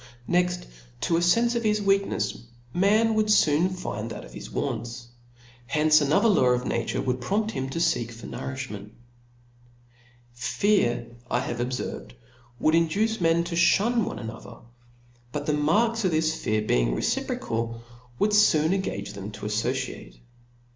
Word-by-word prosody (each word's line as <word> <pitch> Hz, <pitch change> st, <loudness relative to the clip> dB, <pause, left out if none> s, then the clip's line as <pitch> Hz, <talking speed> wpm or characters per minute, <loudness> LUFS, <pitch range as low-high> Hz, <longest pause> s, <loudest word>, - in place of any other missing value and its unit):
Next 180 Hz, 0 st, +1 dB, 0.4 s
to 165 Hz, -, +1 dB
a -, -, +3 dB
fenfe 230 Hz, +8 st, +3 dB
of 235 Hz, -, 0 dB
hi$ 210 Hz, -1 st, +1 dB
weaknefs 195 Hz, -9 st, 0 dB, 0.3 s
man 215 Hz, +5 st, +3 dB
would 215 Hz, -1 st, +2 dB
foon 160 Hz, -2 st, +4 dB
find 115 Hz, -, -5 dB
that -, -, -7 dB
of -, -, -14 dB
his -, -, -8 dB
wants. 120 Hz, -1 st, -4 dB, 0.6 s
Hence 155 Hz, +3 st, +4 dB
another 145 Hz, +10 st, +3 dB
law 190 Hz, -, +4 dB
of 125 Hz, -, -4 dB
na -, -, -1 dB
ture -, -, -2 dB
would 125 Hz, -1 st, -1 dB
prompt 210 Hz, -, 0 dB
him 135 Hz, -9 st, -3 dB
to 135 Hz, -, -5 dB
feek 165 Hz, -8 st, +1 dB
for 115 Hz, 0 st, -11 dB
nouriftiment. 130 Hz, -6 st, -6 dB, 1.4 s
Fear, 155 Hz, -, +1 dB, 0.2 s
I 120 Hz, -, +1 dB
have 120 Hz, -, -4 dB
obferved, 125 Hz, -, -4 dB, 0.5 s
would 155 Hz, -, +2 dB
induce 195 Hz, +7 st, +1 dB
men 165 Hz, 0 st, +3 dB
to 170 Hz, -, -6 dB
ihun 205 Hz, +7 st, +3 dB
one -, -, -5 dB
another; 110 Hz, 0 st, -9 dB, 0.7 s
but 145 Hz, +1 st, -4 dB
the 150 Hz, -, +1 dB
marks 215 Hz, +11 st, +2 dB
of 185 Hz, -, +3 dB
this 160 Hz, -1 st, +1 dB
fear 110 Hz, -6 st, -1 dB
being -, -, +1 dB
reciprocal, 115 Hz, -, -2 dB, 0.3 s
would 210 Hz, +7 st, +1 dB
foon 165 Hz, -6 st, +4 dB
engage 105 Hz, -, -3 dB
them 100 Hz, 0 st, -7 dB
to -, -, -8 dB
affociate. 105 Hz, -, -3 dB
155 Hz, 155 wpm, -26 LUFS, 120-195 Hz, 1.4 s, foon